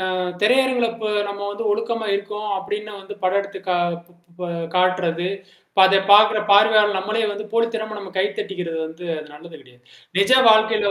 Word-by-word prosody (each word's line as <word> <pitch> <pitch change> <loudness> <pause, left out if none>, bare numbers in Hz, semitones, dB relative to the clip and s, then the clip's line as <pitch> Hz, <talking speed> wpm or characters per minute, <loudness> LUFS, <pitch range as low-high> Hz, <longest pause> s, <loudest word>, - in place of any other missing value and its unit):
அ - - -2 0.3
திரையரங்கில 250 +1 +3
இப்ப 220 -2 -5 0.2
நம்ம 200 0 -7
வந்து 205 +3 -6
ஒழுக்கமா 225 +1 -2
இருக்கோம் 210 +1 -5
அப்பிடின்னு 210 +2 -6
வந்து 200 +1 -10
படம் 185 +2 +2
எடுத்து 200 -1 -9
கா 180 - +1 0.2
இப் 170 0 -15 0.2
இப்ப 180 +1 -7 0.3
காட்டுறது. 180 -1 +1 0.4
இப்ப 195 - +1
அத 195 +1 +4
பார்க்கிற 210 +1 +7
பார்வையாளர் 210 0 +5
நம்மளே 215 +4 -2
வந்து 210 +1 -7
போலித்தனமா 225 -2 -2
நம்ம 195 -2 -9
கை 190 - +3
தட்டிக்கிறது 180 -4 -5
வந்து 160 +3 -11
அது 155 0 -8
நல்லது 160 +2 -13
கெடையாது. 125 -3 -22 0.4
நிஜ 200 +3 +2 0.2
வாழ்க்கையில 220 -1 +3
205 Hz, 170 wpm, -21 LUFS, 185-215 Hz, 0.4 s, பார்க்கிற